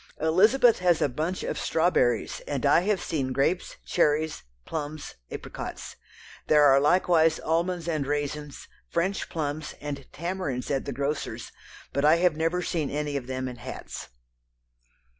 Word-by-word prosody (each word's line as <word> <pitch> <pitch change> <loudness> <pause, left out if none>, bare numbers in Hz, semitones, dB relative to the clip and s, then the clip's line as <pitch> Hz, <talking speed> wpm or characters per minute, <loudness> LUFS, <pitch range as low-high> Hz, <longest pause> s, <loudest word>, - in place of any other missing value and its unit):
Elizabeth 215 +10 +4
has 175 -2 +3
a - - +3
bunch 155 +8 -3
of - - -3
strawberries 130 -9 +1
and 145 -1 -2
I 145 - +6
have 195 +2 0
seen 135 -6 -2
grapes, 140 +7 0
cherries, 155 -1 +1 0.2
plums, 150 -1 -5 0.2
apricots. - - -7 0.5
There 150 -1 +6
are 135 -1 +7
likewise 160 +1 +3
almonds 170 +1 -1
and 155 -5 -1
raisins, 145 0 -3 0.2
French 185 +4 -1
plums, 150 -2 -3
and 140 -2 -6
tamarinds 170 -7 -3
at 135 -1 0
the - - -3
grocers', 140 +3 -3 0.4
but 140 - 0
I 155 +2 +6
have 175 -1 +3
never 165 +3 0
seen 160 -5 -1
any 150 0 -2
of 130 -3 -3
them 130 0 -3
in 125 -1 -7
hats." - - -8
155 Hz, 145 wpm, -27 LUFS, 140-170 Hz, 0.5 s, are